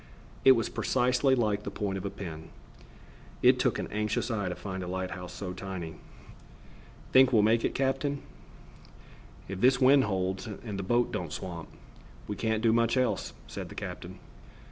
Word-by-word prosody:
It 135 - +9
was 115 -3 0
precisely 125 +1 +2
like 105 -4 +1
the - - -5
point 100 -2 -3
of 95 0 -5
a - - -1
pin. 85 -5 -8 0.9
It - - +6
took - - +2
an - - -2
anxious 105 +3 -1
eye 100 -4 -1
to 90 - -3
find 95 -2 -5
a 90 - -5
light 95 0 -3
house 90 0 -7
so 90 -3 -5
tiny. 90 -4 -6 1.2
"Think 130 0 +7
we'll 110 -4 +5
make 115 +2 +3
it, - - -1
captain?" 135 +1 0 1.2
"If 95 0 -5
this 125 +1 +5
wind 135 0 +6
holds 95 +1 -2
and 105 -1 -6
the - - -1
boat 120 +6 +1
don't 85 -4 -3
swamp, 85 -2 -6 0.6
we 105 - -3
can't 110 +2 -1
do 115 -1 +4
much 115 +1 +2
else," 130 -1 0
said - - -7
the - - -10
captain. - - -6
105 Hz, 175 wpm, -29 LUFS, 95-125 Hz, 1.2 s, It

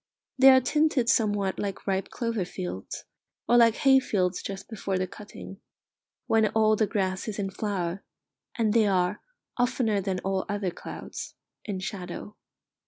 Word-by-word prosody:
They 270 +1 +9
are 260 0 +8
tinted 275 -2 +2
somewhat 205 -5 +1
like 200 -2 -4
ripe 195 -1 -1
clover 230 -4 -2
fields, 95 - -6 0.4
or 240 - +4
like 230 -1 +6
hay 265 -1 +5
fields 185 -7 0
just 195 0 -6
before 195 -4 -3
the 185 - 0
cutting, 205 +1 -11 0.6
when 220 -1 +3
all 215 -1 +4
the 215 0 +1
grass 190 -1 -1
is 215 - -4
in 195 -2 -2
flower, 190 -3 -3 0.5
and 220 -3 +2
they 225 -2 +4
are, 185 0 +1 0.4
oftener 245 -4 +1
than 190 -1 -2
all 190 0 -1
other 205 -3 -1
clouds, - - -8 0.3
in 205 -3 -3
shadow. 195 +1 -6
205 Hz, 155 wpm, -27 LUFS, 190-225 Hz, 0.6 s, They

